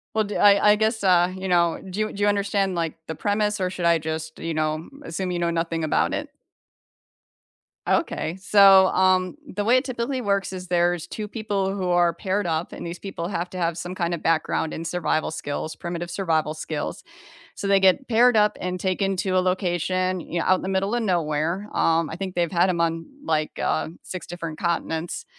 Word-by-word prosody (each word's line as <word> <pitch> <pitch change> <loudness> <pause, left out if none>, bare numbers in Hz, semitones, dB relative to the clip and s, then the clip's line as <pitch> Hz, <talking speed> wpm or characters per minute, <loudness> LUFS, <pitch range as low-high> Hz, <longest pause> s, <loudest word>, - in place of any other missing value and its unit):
Well, 220 - +3
d 205 0 -4
I 205 0 +6
I - - +5
guess, 220 0 0
uh, 180 -1 +4
you 190 0 -5
know, 170 -2 +2
do 190 +2 -6
you 215 0 -1
do 205 - -6
you 205 - +3
understand 200 -1 +1
like 165 -2 -2
the 160 - -4
premise 210 +3 0
or 185 - +1
should 180 -1 -4
I 170 -1 +4
just, 160 0 -5
you 165 - -3
know, 155 +1 -2
assume 180 -3 -3
you 175 - -2
know 170 0 0
nothing 165 -1 -1
about 155 - +1
it? - - -3 1.6
Okay, 160 +2 0
so, 195 -1 +7
um, 185 +1 +2 0.2
the 205 - 0
way 240 +4 +4
it 255 - 0
typically 255 +1 -2
works 200 -3 0
is 185 0 -7
there's 175 -1 +1
2 210 +3 -5
people 205 -3 -2
who 190 -2 -2
are 175 -1 +3
paired 195 +3 -2
up 165 0 -2
and - - -7
these 170 +1 -6
people 190 -4 -5
have 180 -2 -3
to 185 - -7
have 170 -2 -1
some 180 +2 -5
kinda 170 -1 -1
background 160 -1 0
in 165 - -5
survival 165 -2 -1
skills, 155 0 -4
primitive 175 0 -5
survival 160 -4 0
skills. 155 +3 -5 0.5
So 200 - -4
they 195 0 +5
get 190 +8 +3
paired 240 +1 +4
up 210 0 +3
and 180 0 -3
taken 195 +1 0
to 190 +1 -1
a - - +5
location, 185 0 0
you 170 0 -4
know, - - -1
out 185 - +5
in - - -7
the 190 - -4
middle 195 +2 0
of 240 - +1
nowhere. 170 0 -1
Um, 165 -1 +2
I - - -5
think 185 +1 -5
they've 170 -2 0
had 175 +1 +3
'em 175 -2 -1
on, 165 0 -1 0.2
like, 155 - -1
uh, - - 0
6 185 - -7
different 165 -3 -6
continents. 170 -1 -2
180 Hz, 210 wpm, -24 LUFS, 165-200 Hz, 1.6 s, so